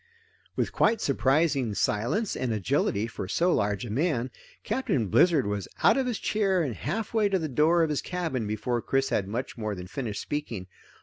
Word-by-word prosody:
With -, -, 0 dB
quite 225 Hz, +1 st, +2 dB
surprising 135 Hz, -, +1 dB
silence 120 Hz, -, 0 dB
and 130 Hz, -2 st, -2 dB
agility 105 Hz, 0 st, 0 dB
for 110 Hz, -4 st, -6 dB
so 175 Hz, -, +2 dB
large 105 Hz, +3 st, 0 dB
a 110 Hz, -, -6 dB
man, 130 Hz, -1 st, 0 dB, 0.3 s
Captain 135 Hz, -, -1 dB
Blizzard 160 Hz, -, +4 dB
was 100 Hz, -1 st, -2 dB, 0.2 s
out -, -, +6 dB
of 265 Hz, -2 st, 0 dB
his 240 Hz, -4 st, -1 dB
chair 195 Hz, -4 st, +1 dB
and 135 Hz, -6 st, -2 dB
half 210 Hz, -, -4 dB
way 215 Hz, -2 st, +3 dB
to 195 Hz, -, +2 dB
the 160 Hz, -3 st, -2 dB
door 155 Hz, +5 st, +3 dB
of 160 Hz, -, 0 dB
his 150 Hz, -, 0 dB
cabin 165 Hz, -11 st, -3 dB
before 110 Hz, +3 st, -1 dB
Chris 135 Hz, +2 st, 0 dB
had 95 Hz, -, 0 dB
much 120 Hz, +3 st, -4 dB
more 110 Hz, -2 st, -2 dB
than 90 Hz, -1 st, -7 dB
finished 105 Hz, +1 st, -4 dB
speaking. 120 Hz, -10 st, -4 dB
135 Hz, 190 wpm, -27 LUFS, 110-175 Hz, 0.3 s, out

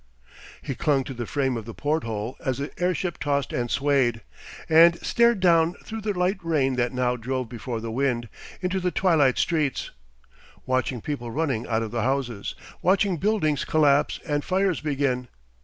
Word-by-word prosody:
He 135 Hz, -, -3 dB
clung 140 Hz, 0 st, +1 dB
to 135 Hz, -, -7 dB
the 120 Hz, -2 st, -5 dB
frame 135 Hz, -3 st, 0 dB
of 110 Hz, -, -6 dB
the 115 Hz, -, -8 dB
porthole 120 Hz, -6 st, -2 dB
as 130 Hz, -4 st, -1 dB
the 140 Hz, +1 st, -4 dB
airship 180 Hz, -1 st, -1 dB
tossed 140 Hz, -2 st, -1 dB
and 120 Hz, -1 st, -1 dB
swayed, 135 Hz, -5 st, +1 dB, 0.5 s
and 165 Hz, +2 st, +6 dB
stared 235 Hz, -2 st, +3 dB
down 170 Hz, -2 st, +4 dB
through 220 Hz, 0 st, -6 dB
the 205 Hz, -3 st, -2 dB
light 185 Hz, +2 st, +1 dB
rain 145 Hz, -6 st, +1 dB
that 120 Hz, -1 st, 0 dB
now 125 Hz, -1 st, 0 dB
drove 125 Hz, 0 st, -3 dB
before 120 Hz, 0 st, -5 dB
the 115 Hz, 0 st, -5 dB
wind, 120 Hz, -1 st, 0 dB, 0.3 s
into 185 Hz, +1 st, 0 dB
the 180 Hz, 0 st, 0 dB
twilight 165 Hz, -8 st, +3 dB
streets, 155 Hz, -5 st, 0 dB, 0.7 s
watching 130 Hz, -2 st, -1 dB
people 130 Hz, -4 st, -4 dB
running 130 Hz, -4 st, -1 dB
out 115 Hz, 0 st, 0 dB
of 110 Hz, -, -5 dB
the 115 Hz, -1 st, -1 dB
houses, 125 Hz, -5 st, -2 dB, 0.3 s
watching 190 Hz, 0 st, +2 dB
buildings 155 Hz, -7 st, +1 dB
collapse 145 Hz, -2 st, +3 dB
and 145 Hz, -3 st, -1 dB
fires 190 Hz, -1 st, +1 dB
begin. 135 Hz, -4 st, -1 dB
140 Hz, 170 wpm, -25 LUFS, 125-170 Hz, 0.7 s, and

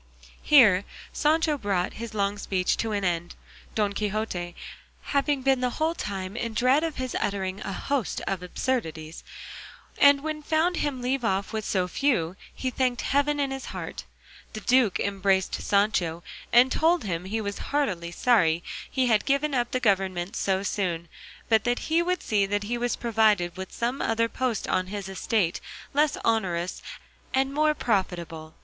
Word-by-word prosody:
Here 215 Hz, -10 st, +6 dB, 0.3 s
Sancho 305 Hz, -1 st, +2 dB
brought 195 Hz, -5 st, -1 dB
his 230 Hz, -2 st, -6 dB
long 200 Hz, 0 st, 0 dB
speech 185 Hz, -2 st, 0 dB
to 225 Hz, -, -1 dB
an 205 Hz, -1 st, -1 dB
end, 175 Hz, -1 st, -1 dB, 0.4 s
Don 205 Hz, -2 st, +1 dB
Quixote 200 Hz, -4 st, -3 dB, 0.5 s
having 280 Hz, -1 st, 0 dB
been 265 Hz, -1 st, +3 dB
the 250 Hz, -, +1 dB
whole 315 Hz, +1 st, +1 dB
time 195 Hz, -, -5 dB
in 230 Hz, -2 st, -3 dB
dread 255 Hz, +6 st, +3 dB
of 325 Hz, -2 st, -2 dB
his 255 Hz, -1 st, -4 dB
uttering 195 Hz, -1 st, -2 dB
a -, -, -4 dB
host 275 Hz, +4 st, -2 dB
of 195 Hz, -2 st, -2 dB
absurdities; 165 Hz, -6 st, -3 dB, 0.8 s
and 285 Hz, 0 st, +7 dB
when 310 Hz, 0 st, -2 dB
he -, -, -12 dB
found 325 Hz, +4 st, +1 dB
him 265 Hz, -4 st, -2 dB
leave 260 Hz, +1 st, 0 dB
off 200 Hz, -1 st, -1 dB
with 220 Hz, -1 st, -2 dB
so 185 Hz, -2 st, 0 dB
few, 180 Hz, -, 0 dB, 0.2 s
he 255 Hz, -, -3 dB
thanked 255 Hz, -1 st, 0 dB
heaven 285 Hz, +1 st, +1 dB
in 275 Hz, -1 st, 0 dB
his 270 Hz, 0 st, -5 dB
heart. -, -, -6 dB, 0.5 s
The 215 Hz, -, -6 dB
duke 245 Hz, -5 st, +3 dB
embraced 195 Hz, -1 st, 0 dB
Sancho 185 Hz, -5 st, +1 dB, 0.3 s
and 250 Hz, +2 st, +6 dB
told 335 Hz, +1 st, +2 dB
him 180 Hz, -3 st, -3 dB
he 215 Hz, +4 st, -2 dB
was 200 Hz, -2 st, -4 dB
heartily 195 Hz, -13 st, 0 dB
sorry 175 Hz, -5 st, +2 dB, 0.3 s
he 260 Hz, -1 st, +1 dB
had 220 Hz, -4 st, +3 dB
given 280 Hz, +1 st, +1 dB
up 240 Hz, -2 st, +1 dB
the 255 Hz, -, -1 dB
government 190 Hz, -5 st, 0 dB
so 190 Hz, 0 st, 0 dB
soon, 175 Hz, -5 st, -2 dB, 0.4 s
but 220 Hz, -1 st, +3 dB
that 245 Hz, 0 st, +1 dB
he 325 Hz, +2 st, +1 dB
would 360 Hz, +1 st, -1 dB
see 205 Hz, -2 st, +1 dB
that 205 Hz, +1 st, -1 dB
he 230 Hz, +4 st, -2 dB
was 240 Hz, 0 st, -1 dB
provided 215 Hz, -6 st, +2 dB
with 190 Hz, 0 st, -7 dB
some 240 Hz, +3 st, -2 dB
other 230 Hz, 0 st, +1 dB
post 245 Hz, -2 st, -2 dB
on 185 Hz, 0 st, 0 dB
his 200 Hz, 0 st, -5 dB
estate 190 Hz, -2 st, 0 dB, 0.3 s
less 295 Hz, +1 st, +2 dB
onerous 185 Hz, -6 st, 0 dB, 0.5 s
and 270 Hz, +1 st, +1 dB
more 305 Hz, +1 st, +2 dB
profitable. 170 Hz, -, -2 dB
220 Hz, 170 wpm, -26 LUFS, 190-265 Hz, 0.8 s, and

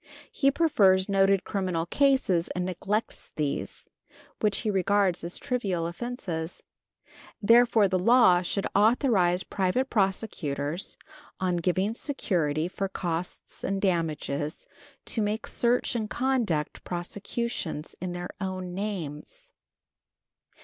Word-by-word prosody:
He 275 Hz, -, +3 dB
prefers 200 Hz, -, +3 dB
noted 195 Hz, -1 st, +3 dB
criminal 185 Hz, -5 st, -1 dB
cases 230 Hz, -7 st, +2 dB
and 180 Hz, 0 st, -1 dB
neglects 195 Hz, +4 st, -3 dB
these, 150 Hz, -2 st, -3 dB, 0.5 s
which 210 Hz, -2 st, +1 dB
he 215 Hz, -, 0 dB
regards 195 Hz, -2 st, +2 dB
as 170 Hz, +1 st, -3 dB
trivial 195 Hz, -9 st, -1 dB
offenses. 170 Hz, -4 st, -5 dB, 0.8 s
Therefore 230 Hz, -1 st, +5 dB
the 185 Hz, -1 st, 0 dB
law 215 Hz, -3 st, +6 dB
should 195 Hz, +2 st, -2 dB
authorize 205 Hz, -5 st, +3 dB
private 205 Hz, +8 st, -1 dB
prosecutors, 180 Hz, -6 st, -1 dB, 0.4 s
on 180 Hz, -2 st, 0 dB
giving 185 Hz, +5 st, 0 dB
security 170 Hz, -, -1 dB
for 195 Hz, +1 st, -3 dB
costs 175 Hz, -2 st, -4 dB
and 195 Hz, 0 st, -1 dB
damages, 160 Hz, -5 st, -1 dB, 0.4 s
to 225 Hz, -, -1 dB
make 210 Hz, +1 st, -1 dB
search 240 Hz, +1 st, +1 dB
and 220 Hz, -3 st, -2 dB
conduct 235 Hz, -, -1 dB
prosecutions 180 Hz, -2 st, -4 dB
in 180 Hz, -1 st, -3 dB
their 175 Hz, 0 st, -5 dB
own 185 Hz, -2 st, -4 dB
names. 200 Hz, -, -5 dB
190 Hz, 110 wpm, -27 LUFS, 175-220 Hz, 0.8 s, law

